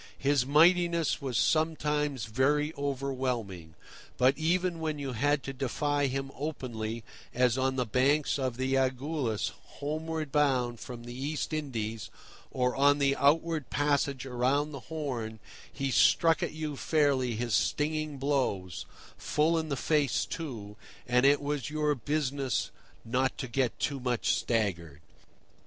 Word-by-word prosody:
His 140 -2 +2
mightiness 170 +2 +4
was 130 -4 -2
sometimes 150 -5 +1
very 145 +7 +1
overwhelming; 130 - -3 0.4
but 130 +2 +4
even 170 +2 0
when 155 -2 -2
you 140 -2 -4
had 145 +4 +1
to 135 - -5
defy 145 +2 0
him 135 +1 -3
openly, 115 -6 -4 0.3
as 125 -1 +3
on 130 0 0
the 125 -1 0
banks 140 +6 +2
of 130 -3 -2
the 130 +1 -1
Agulhas 130 -3 0 0.3
homeward 155 0 -3
bound 130 -5 +1
from 120 -2 -8
the 120 0 -8
East 145 +5 -3
Indies, 115 - -3 0.4
or 125 -1 0
on 145 +1 +4
the 140 -1 +2
outward 155 +1 +2
passage 140 -2 0
round 135 +4 0
the 140 - -5
Horn, 130 -9 -4 0.3
he 135 -1 -2
struck 165 +5 +4
at - - -1
you 155 -2 -4
fairly 140 -5 +1
his 120 0 -2
stinging 155 -1 0
blows 130 - -1 0.3
(full 155 +3 +1
in 160 -1 -4
the 140 - -1
face, 145 -5 +1
too), 110 -10 -6 0.3
and 125 +2 +4
it 145 +1 +5
was 145 -1 -2
your 150 0 +1
business 140 -1 -1 0.3
not 130 +3 0
to 135 - -4
get 125 0 0
too 140 -2 -1
much 125 -2 -1
staggered. 85 - -1
140 Hz, 140 wpm, -30 LUFS, 125-150 Hz, 0.4 s, it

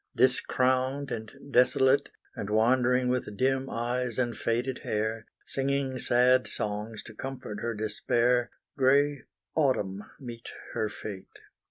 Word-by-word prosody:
Discrowned 130 +2 +2
and 110 -1 -4 0.2
desolate, 130 +2 +4 0.3
And 100 - -5
wandering 125 +3 +3
with 125 -5 -2
dim 135 +2 +1
eyes 120 0 -2
and 120 -2 0
faded 120 +4 -1
hair, 110 +1 -2 0.2
Singing 135 -1 -1
sad 125 +1 +4
songs 105 +1 -3
to 115 - -10
comfort 125 -3 -6
her 115 -1 -2
despair, 120 +3 +1 0.3
Grey 140 +1 +3 0.3
Autumn 105 -10 +1 0.2
meets 120 -3 -8 0.2
her 110 - 0
fate. 105 -2 -8
125 Hz, 120 wpm, -28 LUFS, 110-130 Hz, 0.3 s, desolate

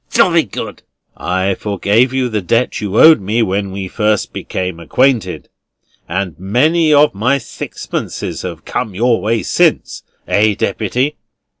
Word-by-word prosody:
"Jolly - - +3
good." - - -7 0.3
"I 95 +2 -1
forgave 105 +5 +1
you 130 -1 0
the 110 -3 -2
debt 115 +8 0
you 105 0 -1
owed 160 -7 +7
me 110 +5 0
when 100 -1 -1
we 95 0 -5
first 105 +1 -1
became 90 -2 -4
acquainted, 125 - 0 0.6
and 90 0 -2
many 155 - +2
of 150 0 +5
my 125 +8 +1
sixpences 115 -4 -5
have - - -7
come 110 -6 -3
your 120 +3 +2
way 110 +1 0
since; - - +1 0.3
eh, 105 0 +2
Deputy?" 125 +8 -1
110 Hz, 140 wpm, -16 LUFS, 95-125 Hz, 0.6 s, owed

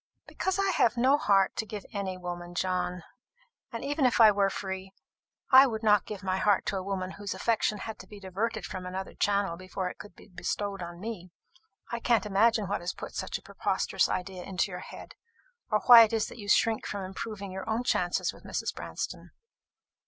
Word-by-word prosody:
"Because 380 0 -2
I 390 -1 +2
have 240 -8 +2
no 260 +4 +5
heart 195 -8 +3
to 220 - -1
give 205 -2 -7
any 195 -2 -3
woman, 175 -1 -6
John. 180 -1 -1 0.7
And 230 +2 -5
even 290 +1 -1
if 240 - 0
I 220 -2 +9
were 200 -1 +2
free, 190 0 -5 0.6
I 265 +1 +9
would 220 -2 -4
not 210 -3 +4
give 205 -2 -7
my 190 -1 0
heart 200 +1 +2
to - - -1
a - - -2
woman 190 -1 -3
whose 200 -1 -5
affection 215 +1 +1
had 220 +2 -7
to - - -11
be 210 - -11
diverted 200 +4 -3
from 180 -1 -6
another 190 +1 -5
channel 200 -4 0
before 185 0 -4
it - - -16
could 205 - -11
be - - -16
bestowed 195 +1 -3
upon 170 0 -7
me. 200 -4 -6 0.6
I 235 - -2
can't 230 -3 +2
imagine 210 +2 +3
what 200 - -2
has 175 - -3
put - - -8
such - - -3
a - - -18
preposterous - - 0
idea 185 0 -3
into 190 +2 -2
your 180 - -5
head, - - -10 0.6
or 215 -1 +2
why 240 -2 +10
it 225 0 +4
is 220 -1 0
that - - -11
you 205 -1 -7
shrink 225 +1 +3
from 200 -1 -4
improving 195 +1 -6
your 190 +3 -6
own 225 +3 0
chances 180 -7 0
with - - -16
Mrs. - - -3
Branston." - - -6
200 Hz, 205 wpm, -29 LUFS, 185-220 Hz, 0.7 s, why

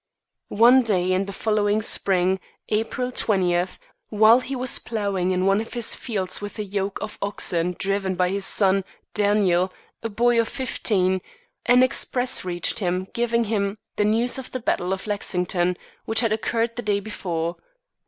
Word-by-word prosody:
One 240 +5 +6
day 185 -6 +1
in 190 +1 +1
the 200 - -6
following 210 0 0
spring, 190 -2 +1 0.3
April 225 +4 -1
twentieth, 180 -6 +1 0.3
while 220 +3 +6
he 270 +1 -5
was 255 0 +1
ploughing 200 -5 -2
in 185 0 +1
one 195 +2 +3
of 225 - -8
his 235 -2 +1
fields 195 -6 -2
with 205 +2 -7
a 210 - -2
yoke 200 0 -3
of 210 - -7
oxen 180 -3 0
driven 195 -1 -1
by 180 0 +1
his 195 +1 -2
son, 195 0 +2 0.3
Daniel, 200 -3 +2 0.3
a 230 - -3
boy 235 +2 +2
of 230 - -3
fifteen, 190 -8 0 0.5
an 250 +1 +6
express 255 -1 0
reached 175 +1 -2
him 185 -1 -1
giving 235 0 +1
him 205 -2 -1 0.2
the 210 - +1
news 230 +5 +2
of 260 - -8
the 255 - -4
battle 185 -5 -1
of 190 0 -3
Lexington, 180 -3 -1 0.3
which 225 +1 +2
had 230 -3 +1
occurred 230 +1 -1
the - - -2
day 205 -2 0
before. 175 -5 -4
205 Hz, 165 wpm, -23 LUFS, 185-225 Hz, 0.5 s, One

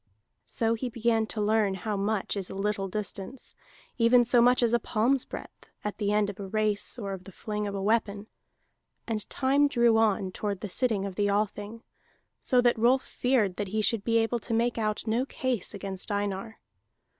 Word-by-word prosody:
So 225 0 +1
he 245 +2 -3
began 225 -1 +1
to 220 - -4
learn 210 -2 +2
how 210 +3 -3
much 200 +1 -1
is 195 -2 -2
a - - -7
little 195 0 -1
distance, 210 +4 -5 0.5
even 240 +1 +5
so 240 0 +5
much 245 +1 +4
as 235 -1 +2
a 240 - +4
palm's 245 +5 +1
breadth, - - -10
at 210 0 -4
the 205 -1 0
end 210 0 +2
of 200 -1 -7
a 195 - -5
race 215 +2 0
or 200 -4 -4
of 185 -1 -8
the 195 - -10
fling 210 +2 -4
of 200 - -4
a 195 - -3
weapon. 210 -1 0 0.8
And 220 -3 -3
time 280 +2 +3
drew 235 -4 +3
on 205 -4 +2
toward 200 0 -3
the 210 - -5
sitting 215 -1 0
of 195 - -4
the 205 +2 0
Althing, 210 +2 -2 0.6
so 250 -2 +3
that 240 -2 +2
Rolf 255 +3 +4
feared 230 -8 0
that 205 - -2
he 215 +3 -1
should 210 0 +1
be 230 +1 +2
able 225 +1 +1
to 230 +1 -3
make 235 +1 +1
out 215 -1 -1
no 230 +3 +1
case 260 -6 -2
against 195 0 -3
Einar. 205 +2 -3
215 Hz, 200 wpm, -28 LUFS, 200-235 Hz, 0.8 s, even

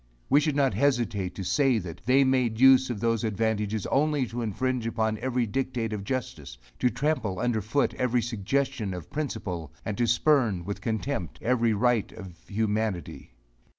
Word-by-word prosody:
We 140 - +7
should 150 -1 0
not 140 -2 +2
hesitate 115 -9 0
to 95 - -5
say 135 +5 +2
that 85 -5 -6
they 135 +2 +5
made 125 -4 +1
use 130 0 +6
of 120 -4 -3
those 115 0 0
advantages 110 -1 -1
only 145 -1 +1
to 120 +1 -5
infringe 120 +2 -1
upon 110 -1 -1
every 125 -2 0
dictate 115 0 -2
of 100 -2 -4
justice; 80 - -5 0.2
to 125 - +3
trample 120 -6 -1
under 120 0 0
foot 115 +8 0
every 125 -1 0
suggestion 120 -1 -1
of 90 -3 -9
principle, 100 - -4
and 105 - -2
to 120 - +2
spurn, 120 - +2
with 100 +1 -5
contempt, 110 - -3
every 120 -2 +2
right 115 0 +1
of 95 -5 -9
humanity. 105 - -2
115 Hz, 165 wpm, -27 LUFS, 105-130 Hz, 0.2 s, We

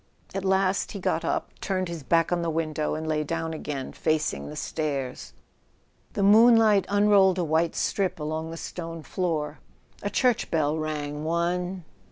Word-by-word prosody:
At 195 - -3
last 190 0 +1
he 200 - -5
got - - 0
up, - - -1
turned 185 -1 -1
his 170 -2 -6
back 165 +5 +2
on 175 -1 +1
the 170 - -1
window, 155 -2 -1
and 160 0 -4
lay 155 -1 0
down 165 +1 -3
again 145 -4 -5
facing 155 -1 -1
the 150 - -8
stairs. 140 -5 -3 0.8
The 200 - 0
moonlight 220 -1 +6
unrolled 200 -2 +4
a 180 - +1
white 160 +1 +1
strip 190 -4 0
along 155 +1 -3
the 165 - -7
stone 165 -1 -6
floor. 155 -5 -2 0.4
A 205 - -2
church 250 +1 +1
bell 155 -2 +1
rang 150 -1 -3
one 175 +3 -1
165 Hz, 165 wpm, -26 LUFS, 155-190 Hz, 0.8 s, moonlight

